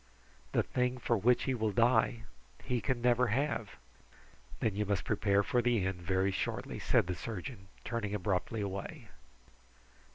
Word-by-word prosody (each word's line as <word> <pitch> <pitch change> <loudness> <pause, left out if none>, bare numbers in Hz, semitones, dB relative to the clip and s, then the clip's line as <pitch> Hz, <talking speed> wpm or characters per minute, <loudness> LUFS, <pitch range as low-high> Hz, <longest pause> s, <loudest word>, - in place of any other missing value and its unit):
The - - +3
thing 125 0 0
for 125 - +1
which 120 +5 +3
he 130 - 0
will 110 -3 0
die, 115 +1 +3 0.4
he 125 -2 -1
can 120 +3 -1
never 125 0 +4
have." 115 -2 -1 0.8
"Then 105 -3 0
you 105 - +1
must 100 -2 -1
prepare 100 -2 +2
for 125 0 +1
the 120 -5 +2
end 95 -2 -2
very 95 +2 +1
shortly" - - -3
said - - +3
the 90 - -2
surgeon, 95 0 -6 0.2
turning 110 -3 -2
abruptly 100 +2 -1
away. 100 - -5
110 Hz, 155 wpm, -33 LUFS, 100-120 Hz, 0.8 s, never